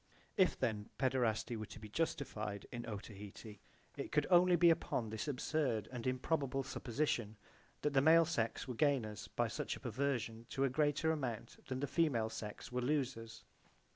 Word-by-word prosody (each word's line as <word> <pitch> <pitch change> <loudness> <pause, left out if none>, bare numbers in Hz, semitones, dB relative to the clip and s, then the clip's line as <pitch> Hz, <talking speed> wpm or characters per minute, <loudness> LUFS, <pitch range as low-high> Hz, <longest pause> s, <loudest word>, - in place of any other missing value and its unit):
If 185 -5 +4
then 105 -2 -1
paederasty 120 -3 +1
were 110 -1 -5
to - - -10
be 110 - -8
justified 110 -7 -2
in 120 -1 -5
Otaheite 105 0 -8 0.4
it - - -4
could - - +3
only 180 0 +7
be 170 0 +7
upon 125 -9 -1
this 110 +6 -3
absurd 135 -4 0
and 125 -1 -4
improbable 135 +1 0
supposition 120 -4 -1 0.5
that 150 - +1
the 135 - +5
male 165 +3 +7
sex 120 -9 -1
were 125 - -3
gainers 120 -6 +1
by - - 0
such - - -3
a - - -10
perversion 120 -2 -2
to 135 - 0
a 135 - +3
greater 150 +3 +2
amount 130 -8 -3
than 130 -1 -3
the - - +1
female 130 -11 +2
sex 105 +2 -6
were 125 0 -1
losers. 120 -5 -1
125 Hz, 170 wpm, -37 LUFS, 110-145 Hz, 0.5 s, only